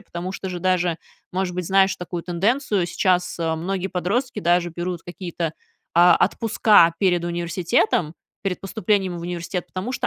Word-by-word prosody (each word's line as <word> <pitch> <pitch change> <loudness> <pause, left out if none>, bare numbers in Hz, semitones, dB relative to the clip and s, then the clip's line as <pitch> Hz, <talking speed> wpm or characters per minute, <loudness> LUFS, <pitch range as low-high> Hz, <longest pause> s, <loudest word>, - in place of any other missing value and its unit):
Потому 180 -2 -6
что 190 -1 -5
же 180 -1 -4
даже 180 -2 +1 0.4
Может 185 0 -1
быть, 180 -2 -3
знаешь 190 +1 +4
такую 175 -1 -5
тенденцию: 195 +2 0
сейчас, 180 0 0
э, 160 -1 0
многие 190 +3 -2
подростки 200 +9 -1
даже 175 +1 +2
берут 175 0 -4
какие-то, 175 -2 -4 0.4
а, 175 +1 +7
отпуска 210 -6 +4
перед 175 -3 +2
университетом, 170 -1 0 0.3
перед 195 -2 -2
поступлением 195 -2 -1
в - - -7
университет. 175 +1 -4
Потому 185 +7 -5
что - - -2
180 Hz, 155 wpm, -22 LUFS, 175-190 Hz, 0.4 s, а